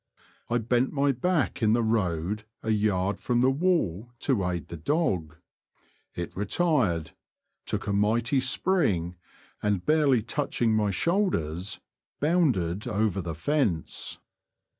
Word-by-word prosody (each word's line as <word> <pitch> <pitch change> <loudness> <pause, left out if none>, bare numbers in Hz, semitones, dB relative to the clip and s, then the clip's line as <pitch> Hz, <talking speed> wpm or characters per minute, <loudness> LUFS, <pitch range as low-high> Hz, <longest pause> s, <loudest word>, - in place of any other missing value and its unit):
I 120 - +2
bent 120 +2 +1
my 140 -1 +2
back 150 +4 0
in 110 -1 +4
the 120 0 +2
road 105 -2 0 0.2
a 110 - 0
yard 100 -2 +1
from 120 -1 +1
the 130 +1 +4
wall 135 - 0
to 125 -9 +1
aid 85 -2 -4
the - - -6
dog. 85 - -1 0.8
It 85 -1 -5
retired, 105 - +1 0.6
took - - -2
a 100 - -1
mighty 115 +6 +2
spring, 125 - +1 0.5
and 100 -4 0
barely 145 -7 +3
touching 120 -2 0
my 105 -1 +2
shoulders^ 95 - -1 0.4
bounded 125 - +1
over 105 -3 0
the 80 -2 -5
fence. 110 - -1
110 Hz, 125 wpm, -27 LUFS, 90-140 Hz, 0.8 s, in